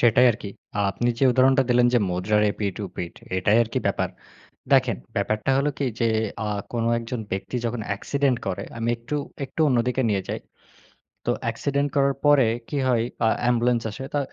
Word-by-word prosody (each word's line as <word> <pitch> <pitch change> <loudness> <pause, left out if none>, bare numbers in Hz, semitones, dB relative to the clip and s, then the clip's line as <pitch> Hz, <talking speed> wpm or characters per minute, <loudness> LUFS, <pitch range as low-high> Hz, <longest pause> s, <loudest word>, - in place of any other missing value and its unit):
সেটাই 125 +1 +5
আরকি। 105 -1 -7 0.3
আ - - +1
আপনি 120 +5 -1
যে 135 - +3
উদাহরণটা 130 +2 +4
দিলেন 120 0 +5
যে - - +6
মুদ্রার 105 +4 +1
এপিট-ওপিট, 100 -4 -4 0.2
এটাই 105 +4 +3
আরকি 115 - -2
ব্যাপার। - - 0 0.6
দেখেন, - - +4 0.2
ব্যাপারটা 110 +4 -1
হলো 140 +2 +2
কি 140 - 0
যে 115 - +3 0.4
আ - - -1 0.2
কোন 115 -1 -1 0.2
একজন 115 +1 -5
ব্যক্তি 95 +6 -3
যখন 115 -1 -2
অ্যাক্সিডেন্ট 130 +5 0
করে, - - -2
আমি 115 +1 -1
একটু, 120 +5 -5 0.3
একটু 145 - -12
অন্যদিকে 125 0 +1
নিয়ে 100 -2 +1
যাই। - - -2 0.9
তো - - +2
অ্যাক্সিডেন্ট 140 0 0
করার 140 0 +3
পরে 145 -4 +6 0.2
কি 145 - -2
হয়? 115 -2 +2 0.2
আ - - +5
অ্যাম্বুলেন্স 120 -1 +2
আসে। 135 +6 -7
তো - - +2
120 Hz, 170 wpm, -24 LUFS, 110-135 Hz, 0.9 s, যে